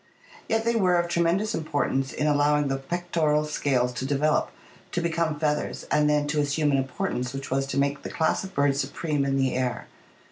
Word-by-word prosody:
Yet 225 Hz, 0 st, +1 dB
they 235 Hz, 0 st, +2 dB
were 185 Hz, -5 st, +3 dB
of 175 Hz, 0 st, +1 dB
tre 170 Hz, 0 st, +1 dB
mendous 195 Hz, +6 st, +1 dB
importance 145 Hz, -5 st, -1 dB
in 150 Hz, -, -2 dB
allowing 145 Hz, -1 st, +2 dB
the 135 Hz, -, 0 dB
pectoral 155 Hz, 0 st, 0 dB
scales 130 Hz, -5 st, 0 dB
to 125 Hz, -, -4 dB
develop, 145 Hz, +2 st, +1 dB, 0.4 s
to -, -, 0 dB
become 165 Hz, -2 st, 0 dB
feathers, 150 Hz, -1 st, -1 dB
and 150 Hz, 0 st, +3 dB
then 150 Hz, 0 st, +2 dB
to 150 Hz, 0 st, 0 dB
assume 145 Hz, +1 st, +1 dB
an 140 Hz, -, +3 dB
importance 130 Hz, -2 st, -3 dB
which 135 Hz, -1 st, -6 dB
was 135 Hz, +1 st, 0 dB
to 135 Hz, -, -3 dB
make 140 Hz, +1 st, +1 dB
the -, -, -6 dB
class 160 Hz, +3 st, 0 dB
of 190 Hz, 0 st, -9 dB
birds 140 Hz, 0 st, +2 dB
supreme 145 Hz, +1 st, -2 dB
in 135 Hz, 0 st, 0 dB
the 135 Hz, -1 st, +1 dB
air. 125 Hz, -1 st, -2 dB
150 Hz, 205 wpm, -26 LUFS, 135-165 Hz, 0.4 s, were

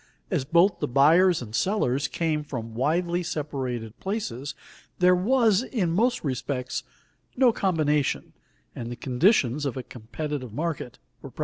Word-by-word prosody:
As 160 Hz, -8 st, 0 dB
both 170 Hz, +6 st, +3 dB
the 150 Hz, -, -1 dB
buyers 160 Hz, +5 st, +4 dB
and 110 Hz, -2 st, -10 dB
sellers 140 Hz, -, +1 dB
came 155 Hz, -1 st, -1 dB
from 120 Hz, -6 st, -6 dB
widely 170 Hz, +8 st, 0 dB
separated 130 Hz, -9 st, -4 dB
places, 150 Hz, -, -4 dB, 0.4 s
there 180 Hz, 0 st, +5 dB
was, 220 Hz, +2 st, +3 dB
in 215 Hz, -10 st, -1 dB
most 240 Hz, +8 st, +1 dB
respects, 130 Hz, -2 st, -3 dB, 0.6 s
no 250 Hz, -2 st, +5 dB
combination, 150 Hz, -8 st, 0 dB, 0.4 s
and 120 Hz, 0 st, -5 dB
the -, -, -4 dB
conditions 130 Hz, -, +2 dB
of 135 Hz, -2 st, -2 dB
a 130 Hz, -, -4 dB
competitive 125 Hz, +2 st, -6 dB
market 155 Hz, -3 st, -3 dB, 0.2 s
were -, -, -9 dB
present. -, -, -22 dB
150 Hz, 140 wpm, -26 LUFS, 125-180 Hz, 0.6 s, there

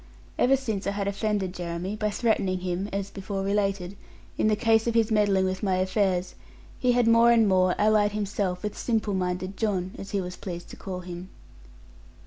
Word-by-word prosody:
Ever 270 Hz, +2 st, +4 dB
since 220 Hz, -7 st, -3 dB
I 200 Hz, -, 0 dB
had 200 Hz, -1 st, -2 dB
offended 200 Hz, -2 st, -1 dB
Jeremy, 175 Hz, +2 st, -4 dB
by 215 Hz, 0 st, -1 dB
threatening 200 Hz, -4 st, 0 dB
him 185 Hz, +2 st, -2 dB
(as 200 Hz, 0 st, -3 dB
before 195 Hz, 0 st, -4 dB
related) 195 Hz, -2 st, -1 dB, 0.4 s
in 215 Hz, -, +2 dB
case 225 Hz, 0 st, +2 dB
of 230 Hz, -, 0 dB
his 225 Hz, -1 st, +3 dB
meddling 205 Hz, -3 st, +3 dB
with 185 Hz, 0 st, -2 dB
my 190 Hz, -3 st, +1 dB
affairs, 185 Hz, -1 st, 0 dB, 0.5 s
he 250 Hz, -1 st, +3 dB
had 240 Hz, -1 st, +3 dB
more 230 Hz, +1 st, +6 dB
and 225 Hz, -2 st, +5 dB
more 185 Hz, -1 st, +3 dB
allied 210 Hz, -1 st, +3 dB
himself 200 Hz, -3 st, -2 dB
with 210 Hz, -, -3 dB
simple 220 Hz, -3 st, -1 dB
minded 185 Hz, +1 st, -2 dB
John, 190 Hz, -4 st, -1 dB
as 195 Hz, -, -7 dB
he 200 Hz, -, -1 dB
was 180 Hz, -1 st, -5 dB
pleased 175 Hz, -2 st, -7 dB
to -, -, -9 dB
call 185 Hz, -2 st, -6 dB
him. 180 Hz, +1 st, -8 dB
200 Hz, 185 wpm, -26 LUFS, 185-215 Hz, 0.5 s, more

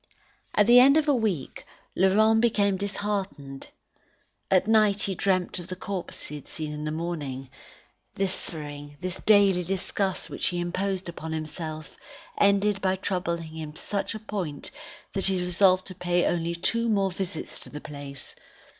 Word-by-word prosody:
At 210 Hz, -, +5 dB
the 240 Hz, +3 st, +8 dB
end 275 Hz, +4 st, +7 dB
of 315 Hz, -1 st, +2 dB
a 290 Hz, -, +5 dB
week, 210 Hz, -, -1 dB, 0.3 s
Laurent 215 Hz, +4 st, +4 dB
became 205 Hz, -4 st, +3 dB
disheartened. 195 Hz, -8 st, -3 dB, 0.8 s
At 190 Hz, -1 st, +4 dB
night 215 Hz, -2 st, +4 dB
he 195 Hz, -, 0 dB
dreamt 185 Hz, -1 st, +1 dB
of 175 Hz, -, -8 dB
the 185 Hz, -, -5 dB
corpses 190 Hz, -1 st, -5 dB
he 150 Hz, -, -6 dB
had 145 Hz, -, -13 dB
seen 155 Hz, -1 st, -5 dB
in 150 Hz, 0 st, -5 dB
the 155 Hz, -, -2 dB
morning. 145 Hz, -6 st, -4 dB, 0.6 s
This 195 Hz, -1 st, +1 dB
suffering, 145 Hz, -2 st, -6 dB
this 185 Hz, +1 st, -4 dB
daily 200 Hz, -4 st, +5 dB
disgust 190 Hz, +1 st, -2 dB
which -, -, -2 dB
he 175 Hz, -, 0 dB
imposed 185 Hz, +2 st, -2 dB
on 160 Hz, 0 st, -4 dB
himself, 155 Hz, 0 st, -5 dB, 0.4 s
ended 200 Hz, 0 st, +3 dB
by 190 Hz, -1 st, +2 dB
troubling 180 Hz, -3 st, -2 dB
him 155 Hz, -1 st, -7 dB
to -, -, -10 dB
such 205 Hz, +2 st, -2 dB
a -, -, -5 dB
point, 195 Hz, -9 st, -5 dB, 0.4 s
that 195 Hz, -, 0 dB
he 190 Hz, -1 st, +2 dB
resolved 185 Hz, +1 st, +3 dB
to 190 Hz, -, -7 dB
pay 175 Hz, -1 st, +1 dB
only 170 Hz, 0 st, 0 dB
two 230 Hz, +7 st, +1 dB
more 195 Hz, -3 st, +2 dB
visits 180 Hz, -3 st, -4 dB
to -, -, -9 dB
the 150 Hz, -, -7 dB
place. 140 Hz, -2 st, -7 dB
185 Hz, 165 wpm, -27 LUFS, 160-200 Hz, 0.8 s, the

